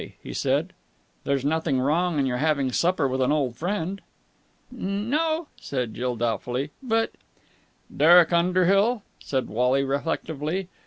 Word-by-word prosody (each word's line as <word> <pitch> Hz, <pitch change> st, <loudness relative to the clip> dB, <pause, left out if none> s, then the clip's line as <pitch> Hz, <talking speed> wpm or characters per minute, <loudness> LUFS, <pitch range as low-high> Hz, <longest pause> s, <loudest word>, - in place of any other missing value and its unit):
he -, -, -7 dB
said. -, -, 0 dB, 0.5 s
"There's 140 Hz, -1 st, 0 dB
nothing 155 Hz, -3 st, +1 dB
wrong 160 Hz, +5 st, +1 dB
in 140 Hz, -, +2 dB
your 125 Hz, -2 st, -1 dB
having 140 Hz, -2 st, +1 dB
supper 170 Hz, +1 st, +1 dB
with 130 Hz, 0 st, -1 dB
an 130 Hz, +2 st, +2 dB
old 140 Hz, -6 st, 0 dB
friend." 190 Hz, +4 st, -3 dB, 0.7 s
"N 205 Hz, 0 st, -3 dB
no," 320 Hz, +1 st, 0 dB
said 125 Hz, -5 st, -3 dB
Jill 125 Hz, 0 st, -2 dB
doubtfully. 120 Hz, +5 st, -2 dB
"But...." 225 Hz, -3 st, 0 dB, 0.8 s
"Derek 170 Hz, +3 st, +6 dB
Underhill," 185 Hz, +6 st, +3 dB, 0.2 s
said 130 Hz, -2 st, -2 dB
Wally 125 Hz, +5 st, +1 dB
reflectively. 155 Hz, +5 st, -2 dB
155 Hz, 130 wpm, -25 LUFS, 130-185 Hz, 0.8 s, Derek